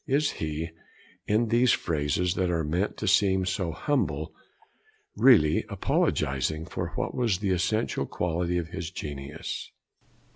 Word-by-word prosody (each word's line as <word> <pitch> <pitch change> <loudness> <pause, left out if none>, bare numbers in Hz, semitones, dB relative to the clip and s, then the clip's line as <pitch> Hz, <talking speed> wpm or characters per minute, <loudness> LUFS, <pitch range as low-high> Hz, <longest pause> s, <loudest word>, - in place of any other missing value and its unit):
Is 145 +2 +2
he, 80 +1 -4 0.6
in 110 +2 +2
these 120 +2 +4
phrases 80 +2 0
that 95 -1 0
are 85 -2 0
meant 85 +7 -1
to - - -3
seem 95 -1 +3
so 90 -2 -1
humble, 145 - -1 0.8
really 80 - +5
apologising 70 +4 0
for 90 0 -4
what - - -2
was 115 -7 +1
the 100 0 -1
essential 95 +5 0
quality 90 0 -1
of 85 -1 -3
his 80 0 -5
genius? 75 -3 -6
90 Hz, 135 wpm, -27 LUFS, 80-100 Hz, 0.8 s, really